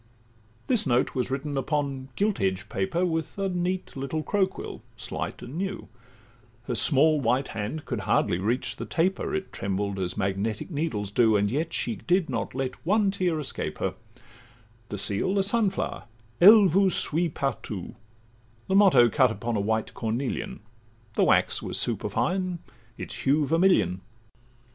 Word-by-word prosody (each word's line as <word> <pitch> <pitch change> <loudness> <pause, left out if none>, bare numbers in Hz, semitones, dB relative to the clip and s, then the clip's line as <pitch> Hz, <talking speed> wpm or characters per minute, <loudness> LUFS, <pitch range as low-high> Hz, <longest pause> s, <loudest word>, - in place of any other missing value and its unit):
This 240 - +2
note 120 -1 +2
was 125 -1 -1
written 140 +2 -3
upon 135 -1 -2
gilt 205 0 0
edged 95 -1 -1
paper 185 -2 0
With 160 0 -2
a 195 -1 -1
neat 180 +1 -2
little 140 +4 -3
crow 200 +1 +2
quill, 190 - -8 0.2
slight - - -5
and 135 +8 -6
new: 195 0 -4 0.7
Her 125 - -3
small 150 +5 +3
white 130 +3 +1
hand 110 +9 -4
could 120 - -3
hardly 95 -3 +1
reach 115 +7 -1
the - - -6
taper, 185 +4 0
It 195 0 -4
trembled 100 0 -2
as 90 +1 -3
magnetic 100 - -2
needles 130 - -2
do, 110 -1 +4
And 100 0 +1
yet 155 +5 -1
she 115 -7 -2
did 175 0 +1
not - - -3
let 130 -1 -4
one 200 +3 +2
tear 180 -5 0
escape 145 - -3
her; - - -1 1.0
The 105 - -4
seal 105 - 0
a 195 - +3
sun 210 +1 +2
flower; 190 - -4 0.4
'Elle 210 +3 +9
vous 190 +2 +4
suit 170 -2 0
partout,' 115 -8 -3 0.7
The - - -2
motto 185 -12 +6
cut 130 +2 +3
upon 115 +1 -3
a - - +1
white 110 +2 -1
cornelian; 115 0 -3 0.5
The - - +3
wax - - +3
was - - -2
superfine, 185 -1 -1 0.4
its - - -7
hue 145 +2 +2
vermilion. 145 - +3
140 Hz, 160 wpm, -26 LUFS, 110-185 Hz, 1.0 s, Elle